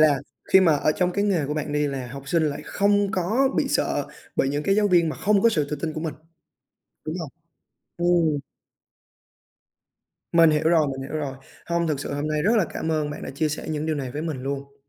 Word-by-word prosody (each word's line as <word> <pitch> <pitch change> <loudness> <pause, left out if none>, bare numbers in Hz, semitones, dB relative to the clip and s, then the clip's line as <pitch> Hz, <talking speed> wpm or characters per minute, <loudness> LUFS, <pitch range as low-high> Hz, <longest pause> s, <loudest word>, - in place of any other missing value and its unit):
là 150 -3 +5 0.3
khi 190 - +8
mà 165 -4 +5
ở 150 - +2
trong 180 +2 0
cái 200 +2 0
nghề 180 -8 +1
của 150 - -2
bạn 150 -1 -3
đi, 150 0 +1
là 135 -3 -4
học 140 +2 -9
sinh 165 +2 +2
lại 150 -2 -1
không 205 0 +2
có 220 +10 +2
bị - - +1
sợ - - 0 0.3
bởi 135 - +2
những 145 +1 -1
cái 195 - +2
giáo 210 -1 +3
viên 175 -3 +4
mà 155 - -4
không 200 -1 +2
có 230 - +6
sự 155 -9 0
tự 150 - -1
tin 155 +2 -3
của 155 - -5
mình, 160 -2 -3 0.9
đúng 155 +1 -3
hông? 160 -4 -5 0.7
Ừm. 170 -3 +2 1.9
Mình 165 -1 +6
hiểu 150 0 +1
rồi, 160 -3 +4
mình 135 -1 -4
hiểu - - -3
rồi. 135 -3 -4 0.3
Hông, 170 0 0
thực 150 -3 -1
sự 145 - -4
hôm 145 +2 -2
nay 155 -1 0
rất 220 +7 +3
là 210 - +4
cảm 160 0 -3
ơn 150 -2 0
bạn 145 - -7
đã - - -5
chia 155 +3 -1
sẻ 150 - -5
những 155 0 -2
điều 155 - 0
này 130 -3 -4
với 150 +4 -4
mình 150 -6 -4
luôn. 140 +1 -5
155 Hz, 240 wpm, -24 LUFS, 145-175 Hz, 1.9 s, khi